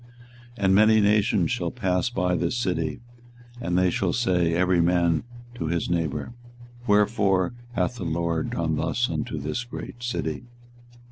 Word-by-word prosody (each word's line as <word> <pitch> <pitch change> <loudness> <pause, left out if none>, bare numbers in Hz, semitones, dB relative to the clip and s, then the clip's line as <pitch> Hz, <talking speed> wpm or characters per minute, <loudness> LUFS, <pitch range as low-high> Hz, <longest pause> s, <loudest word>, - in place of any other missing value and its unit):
24:022:008 100 - -1
And 95 - +4
many 110 +2 +6
nations 105 -4 +2
shall - - -1
pass 90 +5 0
by 90 -6 0
this 105 +8 -1
city, 90 -6 -2 0.6
and 90 -3 0
they 90 -1 +3
shall 90 -1 0
say 90 -8 +1
every 90 0 +3
man 85 -1 +2 0.3
to 120 -10 -4
his 85 +1 -1
neighbour, 85 - -2 0.5
Wherefore 105 -3 +2 0.2
hath 125 0 -1
the 110 - -5
LORD 85 0 -1
done - - -1
thus - - 0
unto - - -3
this 75 +11 -3
great 120 0 -8
city? 120 -6 -3
90 Hz, 150 wpm, -25 LUFS, 85-105 Hz, 0.6 s, many